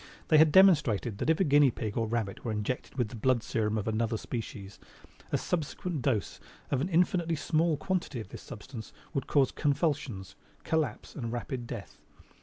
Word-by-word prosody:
They 155 - +7
had 155 -1 +6
demonstrated 140 - +5
that - - 0
if 160 - +3
a - - +5
guinea 145 -2 +5
pig 110 -3 -4
or 115 -1 0
rabbit 110 -4 -2
were 115 - -2
injected 110 +6 -3
with 120 -4 0
the 120 - -9
blood 120 +1 +2
serum 110 -1 0
of 105 - -3
another 110 +1 0
species, 105 -4 -6 0.5
a - - +2
subsequent 165 -1 -2
dose 115 -6 -1 0.3
of 135 -2 +1
an 175 - -1
infinitely 170 -1 +2
small 160 +1 +1
quantity 175 -6 -2
of 105 - -7
this - - -9
substance 110 0 -9 0.2
would 135 - -2
cause 140 -3 +3
convulsions, 140 - -1 0.3
collapse 160 -1 -1
and 115 -5 -4
rapid 120 0 -4
death. 115 -5 -8
130 Hz, 180 wpm, -30 LUFS, 110-155 Hz, 0.5 s, They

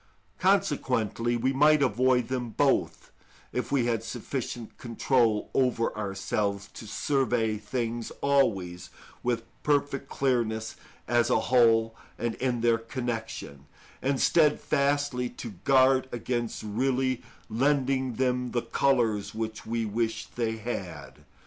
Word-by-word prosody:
Consequently 115 +2 +1
we 130 +3 +1
might 150 +2 +5
avoid 125 +1 +2
them 125 -2 -2
both - - 0 0.4
if 125 -2 -2
we 135 -4 +2
had 115 -2 0
sufficient 120 -1 -5
control 115 -2 +1
over 125 -3 +1
ourselves 100 0 -2
to 110 - -9
survey 120 -4 0
things 115 +1 -3
always 100 -11 +1 0.3
with 120 -2 -1 0.2
perfect 145 -1 0
clearness 115 -5 0 0.3
as 120 0 +2
a - - +3
whole 115 -3 +3 0.2
and 120 0 -1
in 125 -2 0
their 115 -1 +3
connection, 115 - -5 0.3
and 135 0 0
steadfastly 145 -4 +2
to 120 -2 -8
guard 130 -1 +4
against 120 -1 -3
really 130 +3 0 0.3
lending 130 +1 +1
them 125 -1 0
the 120 - 0
colours 115 -4 +1
which 110 0 -4
we 115 0 -1
wish 115 +1 -1
they 110 +3 -3
had. 105 -5 -6
120 Hz, 115 wpm, -28 LUFS, 110-130 Hz, 0.4 s, might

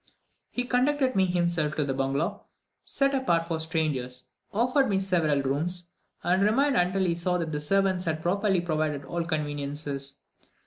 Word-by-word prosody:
He 245 - -2
conducted 255 +2 +1
me 190 -1 +3
himself 170 -4 +1
to 150 - +1
the 135 - -1
bungalow, 135 +4 -1 0.4
set 275 0 +1
apart 170 -12 +1
for 165 -2 -2
strangers, 145 -6 -2 0.3
offered 250 +4 +2
me 195 - +2
several 165 -7 +1
rooms, 170 +6 -2 0.3
and 185 +2 +2
remained 265 +7 +3
until 185 0 +2
he 175 - +2
saw 180 +1 0
that 165 -2 -3
the 150 - -2
servants 190 +3 +1
had 160 -1 -2
properly 195 +1 +2
provided 155 -4 -1
all 170 +4 -2
conveniences. 145 -3 -3
170 Hz, 155 wpm, -27 LUFS, 150-195 Hz, 0.4 s, me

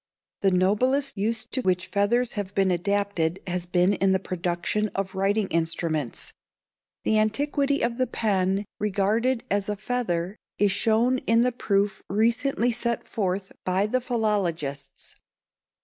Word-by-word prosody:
The 195 - +3
noblest 215 +10 +2
use 220 +3 -1
to 260 - -3
which 185 -4 +1
feathers 220 +6 +1
have 200 -2 -5
been 195 -1 +3
adapted 190 -2 0
has 180 -1 -3
been 180 +2 +3
in 195 0 +2
the 190 - +2
production 180 +3 -1
of 195 -1 -2
writing 195 +2 +1
instruments. 160 -5 -2 0.7
The 215 - +3
antiquity 280 +5 +1
of 235 +1 -1
the 255 - +2
pen, 195 -3 0
regarded 210 +5 +1
as 200 0 0
a 210 - 0
feather, 200 -5 -2 0.2
is 205 -1 +3
shown 235 +5 +2
in 230 +1 +5
the 250 +1 +2
proof 200 -4 0
recently 235 +4 +1
set 235 0 -2
forth 190 -2 -2
by 185 +2 +1
the 255 +4 0
philologists. 195 - -2
200 Hz, 140 wpm, -25 LUFS, 185-230 Hz, 0.7 s, in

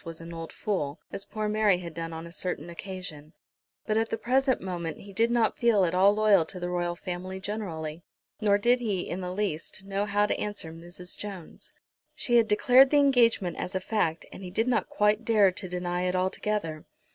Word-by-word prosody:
was 165 -1 -7
an 165 0 -9
old 165 -1 -7
fool, 160 -7 -2
as 195 - -5
poor 215 -1 -3
Mary 210 -3 +3
had 170 -2 -7
done 165 0 -5
on 165 0 -6
a 170 - -10
certain 170 -2 -4
occasion, 170 -4 -7 0.5
but 215 0 +1
at 225 0 +1
the 225 - -1
present 260 +2 +2
moment 175 -3 -4
he 200 0 -12
did 230 +4 +2
not 235 -2 +1
feel 225 -5 +4
at 170 - -1
all 190 +2 +6
loyal 210 -4 +5
to 180 +3 -7
the 175 0 -3
Royal 175 -1 -1
Family 185 +2 -5
generally. 175 -6 -5 0.4
Nor 205 -1 +4
did 240 +4 +3
he, 205 -6 -1
in 185 - -4
the 180 0 -4
least, 190 -2 -3
know 200 +1 -2
how 205 0 +2
to - - -1
answer 205 -6 -5
Mrs. 175 +2 -8
Jones. 195 -5 -9 0.4
She 240 -1 +2
had 230 -2 +4
declared 250 +5 +6
the 295 - +4
engagement 240 -9 +3
as 185 - -4
a - - +2
fact, 180 -5 -1
and - - -10
he 185 - -6
did 225 +6 0
not 245 -2 +1
quite 210 +2 +2
dare 210 -4 +4
to 185 0 -6
deny 180 0 -2
it 180 0 0
altogether. 185 -3 -1
190 Hz, 210 wpm, -28 LUFS, 175-215 Hz, 0.5 s, all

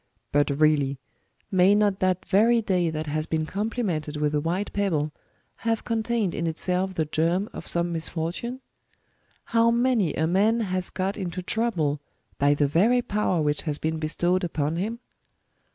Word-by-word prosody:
^' - - -48
But 145 +1 +3
really, 145 -3 +3 0.5
may 190 +1 +5
not 205 -2 +2
that 185 -1 0
very 225 +4 +4
day 185 -6 +1
that 155 0 -3
has 155 +1 -2
been 160 -1 -1
complimented 190 -7 -2
with 150 0 0
a 150 - +1
white 180 +6 -2
pebble, 160 -7 0 0.5
have 225 -1 -1
contained 225 -4 0
in 170 - -2
itself 180 +3 -1
the 160 - 0
germ 170 +6 0
of - - -8
some 170 0 +1
misfortune? 170 +10 -3 0.9
Hoav 230 0 +4
many 235 - +2
a 160 - +1
man 205 +7 +2
has 185 -3 -2
got 190 +2 -2
into 185 -2 -4
trouble 175 -10 0 0.4
by 145 +1 +4
the 145 - +2
very 215 - +3
power 200 -7 0
which 150 0 0
has 145 - -1
been 160 +1 -2
bestowed 175 +4 0
upon 160 -2 -1
him 215 +6 -2
180 Hz, 165 wpm, -25 LUFS, 155-210 Hz, 0.9 s, may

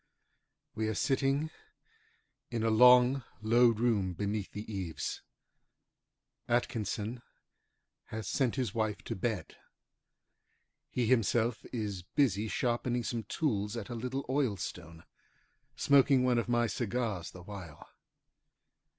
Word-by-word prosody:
We 110 0 -1
are 110 - -1
sitting 135 +5 +1 1.0
in 115 -2 -2
a 115 - +2
long, 125 +3 +6 0.2
low 120 +3 +5
room 110 -5 +1
beneath 100 +2 -3
the 105 - -6
eaves. 95 -6 -4 1.3
Atkinson 115 -1 -1 0.8
has 110 0 -6
sent 130 -4 +1
his 125 -7 -1
wife 110 -3 -1
to - - -4
bed. 105 0 -3 1.3
He 125 - 0
himself 115 0 +2
is 105 -6 -3
busy 105 +1 +1
sharpening 120 +1 0
some 115 -2 -3
tools 105 -4 -1
at 110 -1 -6
a - - -4
little 125 +4 -3
oilstone, 95 - -2 0.7
smoking 135 -2 +4
one 125 -2 +3
of 115 - -3
my 120 0 +3
cigars 110 -4 -2
the 90 - -12
while. 90 -6 -9
115 Hz, 115 wpm, -32 LUFS, 105-125 Hz, 1.3 s, long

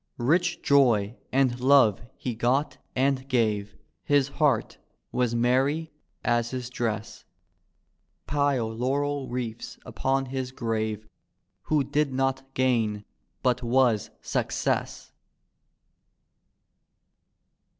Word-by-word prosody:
Rich 170 +8 +1
joy 120 -7 +3 0.2
and 130 -2 +2
love 130 -5 +5 0.2
he 125 - -3
got 125 +6 0 0.2
and 135 0 +1
gave; 105 -5 0 0.3
His 140 -1 +2
heart 140 -7 +1 0.3
was 120 -2 0
meny 135 +7 +1 0.3
as 120 -1 +2
his 125 -1 -5
dress; 110 -3 -3 1.0
Pile 140 -5 +1
laurel 140 +3 -1
wreaths 120 -2 -5
upon 135 0 -1
his 130 -1 -4
grave 110 -3 -2 0.6
Who 150 -2 +2
did 145 0 0
not 135 0 -1
gain, 115 -5 +1 0.4
but 125 -1 +2
was, 120 -3 +2
success! - - -2
125 Hz, 95 wpm, -26 LUFS, 115-135 Hz, 1.0 s, love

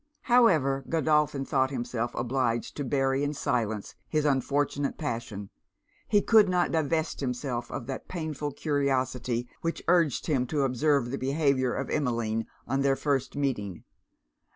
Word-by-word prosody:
However 160 - +4
Godolphin 150 -3 +2
thought 130 -1 +1
himself 120 -2 -3
obliged 120 -2 -1
to 145 - -3
bury 135 +1 +1
in 145 +1 -1
silence 110 -6 -1 0.2
his 155 -1 +1
unfortunate 140 0 0
passion, 115 -8 -4 0.6
he 205 -1 +3
could 215 -4 +6
not 180 -1 +2
divest 160 0 0
himself 125 -2 -3
of 120 - -5
that 135 +1 -6
painful 155 -4 -4
curiosity 130 -4 -1
which 165 0 -3
urged 170 -6 +3
him 130 -6 +1
to 145 +1 0
observe 135 -1 +1
the 135 - -3
behaviour 135 -2 +1
of - - -3
Emmeline 115 -6 -1 0.2
on 135 +2 0
their 135 0 +3
first 140 -2 -1
meeting. 120 -10 -2
135 Hz, 140 wpm, -28 LUFS, 125-150 Hz, 0.6 s, could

